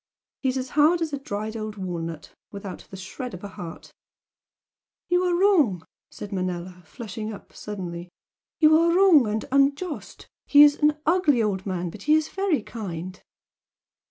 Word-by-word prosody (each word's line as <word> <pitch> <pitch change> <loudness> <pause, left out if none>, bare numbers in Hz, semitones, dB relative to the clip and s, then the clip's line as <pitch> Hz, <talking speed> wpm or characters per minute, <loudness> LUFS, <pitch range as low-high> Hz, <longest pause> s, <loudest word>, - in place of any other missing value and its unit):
He's 265 -1 0
as 260 0 -4
hard 305 +5 +4
as 310 -3 -4
a 280 - -2
dried 215 -3 -5
old 215 -1 -5
walnut, 165 -5 -6 0.2
without 200 -2 -8
the 190 - -9
shred 205 +5 -7
of 180 - -12
a 200 - -6
heart 170 -3 -10 0.6
" - - -70
"You 355 0 +3
are 360 -1 +1
wrong!" 310 - +3 0.2
said 205 - -9
Manella, 180 -1 -4
flushing 220 -2 -6
up 205 - -11
suddenly 180 -4 -7 0.5
"You 310 -1 +6
are 335 +1 +3
wrong 345 - +6
and 215 +1 -2
unjust! 280 +4 0 0.2
He 290 0 +8
is 295 0 +6
an 300 0 +2
ugly 310 -8 +3
old 195 -2 -2
man, 180 -2 -3
but 205 - -11
he 300 +6 +4
is 315 0 +1
very 380 - 0
kind." 185 -5 -7
220 Hz, 165 wpm, -25 LUFS, 185-300 Hz, 0.6 s, He